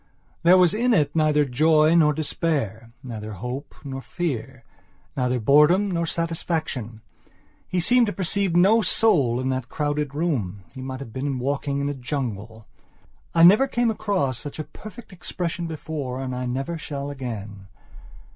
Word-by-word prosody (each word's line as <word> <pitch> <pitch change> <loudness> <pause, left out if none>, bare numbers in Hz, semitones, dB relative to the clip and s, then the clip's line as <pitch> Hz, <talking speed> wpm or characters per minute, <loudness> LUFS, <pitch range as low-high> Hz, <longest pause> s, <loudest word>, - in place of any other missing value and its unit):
There 175 +2 +6
was 180 -3 +5
in 235 +2 +2
it 145 -4 +1
neither 150 -2 +3
joy 155 +4 +4
nor 160 -3 +5
despair; 140 -7 -2
neither 110 -4 -6
hope 125 - -6
nor 135 -2 -6
fear; 130 -6 -4 0.5
neither 125 -1 0
boredom 150 - +4
nor 170 -1 -1
satisfaction. 160 -9 -3 0.7
He 185 - -1
seemed 240 +6 +4
to - - -1
perceive 195 -1 -1
no 200 +6 +5
soul 140 - +2
in 130 +1 -1
that 130 -2 -3
crowded 145 -2 -2
room; 120 - -2
he 130 - -8
might 130 0 -6
have 115 -5 -9
been 135 +1 -2
walking 140 +2 -2
in 140 - -1
a 145 - -1
jungle. 115 -5 -5 0.7
I 165 - +6
never 210 +10 +7
came 240 -3 +1
across 190 - -1
such 145 - -7
a 155 - -3
perfect 215 +5 -12
expression 175 -1 -4
before 150 -5 -5
and 130 -1 -4
I 125 0 -3
never 135 +7 -3
shall 140 -1 -5
again. 105 -7 -7
145 Hz, 155 wpm, -24 LUFS, 125-170 Hz, 0.7 s, never